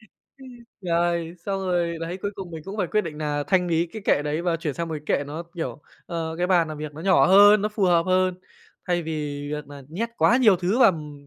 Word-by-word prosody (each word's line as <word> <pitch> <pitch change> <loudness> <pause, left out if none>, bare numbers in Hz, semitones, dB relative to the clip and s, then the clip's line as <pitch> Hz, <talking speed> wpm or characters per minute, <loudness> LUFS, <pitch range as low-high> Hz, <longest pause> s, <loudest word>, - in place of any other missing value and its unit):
Ừm, 220 - -22 0.7
rồi, 170 -2 0
xong 195 -1 -1
rồi 175 -3 -1
đấy, 165 +2 -4
cuối 205 - -1
cùng 190 -3 -8
mình 160 -2 -8
cũng 195 +2 -7
phải 195 -4 0
quyết 215 - +1
định 160 -6 -7
nà 150 -1 -2
thanh 180 +3 +2
lý 165 0 +1
cái 215 +5 -9
kệ 145 - +2
đấy 150 +3 -2
và 175 -2 0
chuyển 155 -3 -4
sang 170 0 -4
một 160 - -4
cái - - +2
kệ 145 - -4
nó, 150 +4 -6
kiểu, 165 -3 -5 0.2
ờ, 165 -2 -4
cái 180 - +1
bàn 175 -3 +3
làm 155 -1 -7
việc 150 -1 -6
nó 155 - -9
nhỏ 185 +1 +4
hơn, 205 +2 +7
nó 210 - +1
phù 210 -2 -1
hợp 170 -2 +3
hơn, 185 0 +2 0.5
thay 175 -1 0
vì 160 0 -5 0.4
việc 150 0 -5
nà 145 -1 -11
nhét 200 +10 -3
quá 240 - +4
nhiều 220 -7 +5
thứ 185 +7 0
vào, 230 - +7
ừm, 150 -4 -9
170 Hz, 255 wpm, -24 LUFS, 160-190 Hz, 0.7 s, hơn